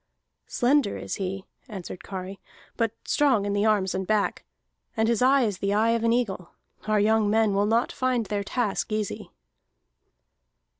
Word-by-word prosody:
"Slender 250 -3 +1
is - - -5
he," 195 0 -4 0.2
answered 185 -4 -8
Kari, 190 0 -7 0.4
"but 230 -2 0
strong 265 -9 +2
in 200 - -1
the 205 +2 +2
arms 200 -3 +2
and 190 0 -3
back, 215 -2 0 0.5
and 220 0 +2
his 235 0 +1
eye 265 +1 +5
is 205 -5 -2
the 200 +1 0
eye 225 +2 +3
of 230 -1 0
an 230 - +3
eagle. 205 -7 -1 0.4
Our 215 -1 +2
young 215 0 +3
men 220 -1 +2
will 200 +1 +2
not 230 +2 +1
find 255 -3 0
their 205 -1 -2
task 215 0 -2
easy." 215 -2 -3
215 Hz, 165 wpm, -26 LUFS, 200-230 Hz, 0.5 s, eye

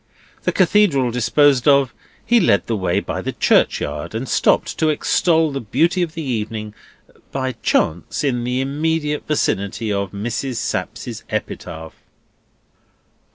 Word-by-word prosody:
The - - +2
Cathedral 175 - +3
disposed 130 +3 +3
of, 140 -3 +4 0.3
he 240 0 +4
led 100 - +3
the 115 - -1
way 95 -1 0
by - - -4
the - - -4
churchyard, 75 +6 +1
and 125 +4 -3
stopped - - +1
to 160 - +3
extol 160 +1 +2
the 140 - -4
beauty 165 - +1
of 170 -1 -2
the 165 - -4
evening—by 110 +2 -5
chance—in 120 - 0
the 125 +2 -1
immediate 150 +2 -1
vicinity 110 -6 -1
of 100 -1 -1
Mrs. 120 +5 -3
Sapsea's - - -4
epitaph. 80 0 -5
130 Hz, 125 wpm, -20 LUFS, 105-150 Hz, 0.3 s, of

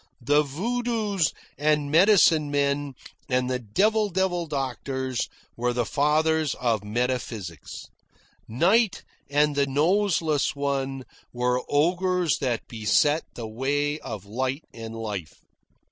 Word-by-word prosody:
The 145 +4 +4
voodoos 210 - -1 0.3
and 150 -1 +1
medicine 165 -4 +5
men 140 -1 0 0.3
and 125 -1 +1
the 125 - -1
devil 210 - +1
devil 180 -2 0
doctors 130 -2 -3 0.3
were 120 +1 0
the 120 -1 0
fathers 155 +1 +1
of 115 -4 0
metaphysics. 110 - -4 0.6
Night 195 - +2 0.3
and 145 +1 +2
the 140 -1 +2
Noseless 160 0 +1
One 135 -1 -2 0.3
were 125 +1 0
ogres 180 +2 +2
that 125 -4 -2
beset 125 +8 +2
the 120 - -5
way 145 +6 -1
of 105 -8 -7
light 130 +7 -2
and 115 0 -8
life. 105 -8 -5
145 Hz, 115 wpm, -25 LUFS, 125-165 Hz, 0.6 s, medicine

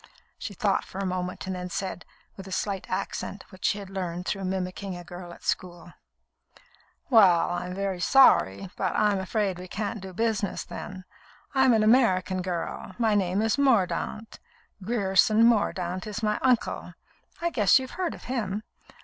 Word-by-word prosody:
She 200 - -6
thought 200 +1 +1
for - - -11
a 195 - -2
moment, 180 0 -3
and 190 0 -3
then 180 0 -5
said, 185 0 -4 0.3
with 195 -1 -10
a - - -9
slight 195 0 -2
accent 195 +1 -4
which 185 -1 -8
she 205 - +2
had 195 -2 -8
learned 180 -2 -4
through 195 -1 -2
mimicking 185 0 -3
a 175 - -9
girl 175 0 -9
at - - -14
school: 175 -1 -3 1.2
"Well, 185 -9 +6
I'm 180 +1 -3
very 195 -2 -2
sorry, 180 - +4
but 185 -3 -1
I'm 210 -2 +2
afraid 190 -1 -1
we 185 - -8
can't 210 +3 -4
do 190 0 -8
business, 215 0 -1
then. 185 0 -8 0.5
I'm 265 -1 +5
an 220 -1 +3
American 190 -6 +3
girl; 180 +1 -4
my 225 -3 +2
name 195 0 +1
is 225 +5 +1
Mordaunt. 225 -3 +1 0.4
Grierson 215 +1 +3
Mordaunt 185 -5 +1
is 215 +1 -5
my 210 0 +1
uncle. 250 -3 0 0.4
I 340 0 -1
guess 210 - +5
you've 260 -1 -4
heard 365 -2 -2
of - - -14
him. 215 -5 -3
195 Hz, 165 wpm, -27 LUFS, 185-220 Hz, 1.2 s, Well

